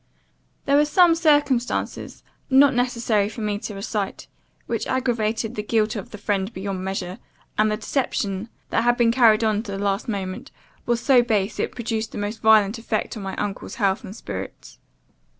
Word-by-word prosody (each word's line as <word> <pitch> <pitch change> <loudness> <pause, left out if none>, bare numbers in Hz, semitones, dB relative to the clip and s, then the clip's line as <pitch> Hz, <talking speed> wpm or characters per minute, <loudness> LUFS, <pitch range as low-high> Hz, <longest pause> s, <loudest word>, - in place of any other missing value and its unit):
"There 280 +1 +4
were 295 - +5
some 345 +3 +5
circumstances, 290 -7 0 0.3
not 270 +1 +6
necessary 235 -4 +1
for 225 - -8
me 210 -1 -1
to 210 - -6
recite, 200 0 -4 0.4
which - - -2
aggravated 230 -3 -1
the 210 - -3
guilt 215 +1 0
of 205 - -6
the 210 - -9
friend 200 0 -1
beyond 190 -2 -4
measure, 190 +1 -4 0.4
and 215 0 +3
the 215 - -1
deception, 215 -4 -2 0.2
that 225 - +2
had 240 0 +3
been 235 -2 +4
carried 230 -3 +5
on 215 -1 +1
to 210 -3 -7
the - - -3
last 200 +2 -1
moment, 190 -3 -4 0.4
was 240 -1 +1
so 260 -1 +5
base, 215 -4 -1
it - - -1
produced 225 -2 -3
the - - -6
most 205 +2 -4
violent 220 0 +4
effect 225 0 -2
on 215 - -6
my 195 0 -5
uncle's 205 -1 -4
health 200 +1 0
and 200 -2 -8
spirits. - - -8
220 Hz, 180 wpm, -23 LUFS, 205-240 Hz, 0.4 s, not